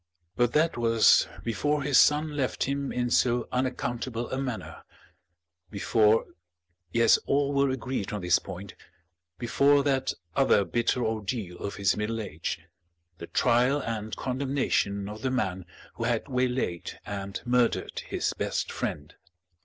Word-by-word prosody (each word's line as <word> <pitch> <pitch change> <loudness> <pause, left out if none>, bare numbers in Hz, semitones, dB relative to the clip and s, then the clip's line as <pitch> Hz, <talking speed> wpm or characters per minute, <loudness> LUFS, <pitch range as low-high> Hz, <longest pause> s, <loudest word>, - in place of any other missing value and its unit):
But 120 -1 +2
that 160 -1 +2
was 115 -2 +5 0.2
before 145 +6 0
his 140 -1 +4
son 150 0 +3
left 135 -3 -1
him 140 0 -2
in 120 -1 -1
so 120 -1 +2
unaccountable 120 -2 -2
a 130 - -1
manner; 125 -4 -5 0.9
before 110 +1 +3 0.7
yes, 115 -1 +5
all 140 0 +2
were 140 0 +3
agreed 130 -5 -3
on 105 -1 -3
this 90 -1 +3
point 95 +1 -8 0.6
before 140 +6 +3
that 135 -2 +1 0.2
other 120 -7 +4
bitter 120 +6 0
ordeal 110 -4 -3
of 100 - -4
his 100 -2 +2
middle 105 +2 -2
age, 85 -7 -4 0.6
the 85 - -7
trial 125 +5 +3
and 110 -4 -4
condemnation 130 -7 -1
of 105 +1 -8
the 130 - 0
man 95 -8 -1 0.3
who 115 - -4
had 120 -2 0
waylaid 125 -9 -2
and 100 -1 -5
murdered 125 -1 +1
his - - -1
best - - -2
friend. 75 -1 -4
120 Hz, 135 wpm, -27 LUFS, 105-130 Hz, 0.9 s, was